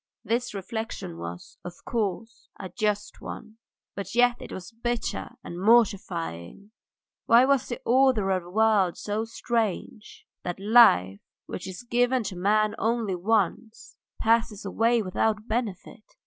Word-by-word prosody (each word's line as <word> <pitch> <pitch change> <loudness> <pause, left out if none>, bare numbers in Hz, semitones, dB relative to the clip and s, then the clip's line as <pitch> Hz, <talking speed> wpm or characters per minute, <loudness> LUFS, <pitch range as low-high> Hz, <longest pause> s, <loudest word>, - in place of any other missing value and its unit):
This 240 -1 -1
reflection 195 - -5
was, 85 +1 -8
of 175 0 -8
course, 225 0 -3
a 190 - -6
just 210 +1 -2
one, 220 0 -9 0.4
but 200 +3 -6
yet 245 0 +3
it - - -9
was 185 +4 -8
bitter 240 +1 -3
and 175 +1 -7
mortifying; 200 - +1 0.6
why 235 +2 +7
was 275 -3 +2
the 240 - -5
order 250 -6 +3
of 185 -1 +1
the 175 - -13
world 210 -3 +2
so 215 +2 -2
strange, 225 -2 -3 0.2
that 175 +1 -5
life, 145 - +5 0.3
which 180 - -7
is 185 +5 -8
given 245 +1 +1
to 190 - -5
man 210 +3 +2
only 225 -3 0
once, 215 +3 -1 0.2
passes 225 -2 +1
away 225 +4 +2
without 210 +3 -1
benefit? 215 -4 -3
215 Hz, 135 wpm, -26 LUFS, 190-230 Hz, 0.6 s, why